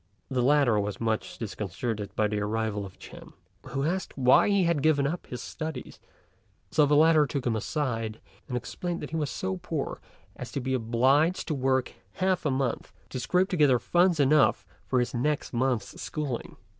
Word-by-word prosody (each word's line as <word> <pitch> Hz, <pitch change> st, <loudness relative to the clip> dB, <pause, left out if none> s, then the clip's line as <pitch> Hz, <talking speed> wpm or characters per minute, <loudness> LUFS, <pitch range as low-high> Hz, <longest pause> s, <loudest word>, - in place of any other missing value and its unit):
The 130 Hz, -1 st, +1 dB
latter 135 Hz, -4 st, +4 dB
was 105 Hz, 0 st, -3 dB
much 110 Hz, -1 st, -2 dB
disconcerted 105 Hz, 0 st, -4 dB
by 110 Hz, -, +2 dB
the 105 Hz, 0 st, -2 dB
arrival 105 Hz, -1 st, -2 dB
of 95 Hz, -, -16 dB
Ch'ên, -, -, -12 dB, 0.3 s
who 135 Hz, -, -2 dB
asked 185 Hz, +4 st, -2 dB
him 135 Hz, -, -6 dB
why 130 Hz, -, +6 dB
he 200 Hz, -2 st, +3 dB
had 170 Hz, -4 st, +1 dB
given 145 Hz, -2 st, +3 dB
up 165 Hz, +5 st, -3 dB
his 125 Hz, -, -6 dB
studies; 160 Hz, 0 st, -6 dB, 0.7 s
so 150 Hz, -2 st, +4 dB
the 145 Hz, -, +3 dB
latter 155 Hz, -1 st, +5 dB
took 135 Hz, -1 st, -3 dB
him 120 Hz, -2 st, +1 dB
aside, 115 Hz, -3 st, -2 dB, 0.3 s
and 125 Hz, -, -2 dB
explained 175 Hz, +8 st, -4 dB
that 150 Hz, -, -6 dB
he -, -, -3 dB
was 150 Hz, -3 st, -1 dB
so 190 Hz, 0 st, -3 dB
poor 165 Hz, -5 st, -4 dB, 0.3 s
as -, -, -8 dB
to -, -, -1 dB
be 130 Hz, 0 st, -2 dB
obliged 130 Hz, +8 st, +2 dB
to -, -, +1 dB
work 130 Hz, -2 st, 0 dB, 0.2 s
half 185 Hz, -3 st, 0 dB
a -, -, +2 dB
month 130 Hz, -2 st, -1 dB, 0.2 s
to 130 Hz, -, -4 dB
scrape 180 Hz, +9 st, +1 dB
together 145 Hz, -8 st, +4 dB
funds 175 Hz, -, +2 dB
enough 145 Hz, +1 st, +4 dB, 0.2 s
for 130 Hz, -, +2 dB
his 125 Hz, -, -1 dB
next 140 Hz, +4 st, -1 dB
month's 125 Hz, -3 st, -1 dB
schooling. 145 Hz, -6 st, -4 dB
135 Hz, 185 wpm, -27 LUFS, 115-155 Hz, 0.7 s, why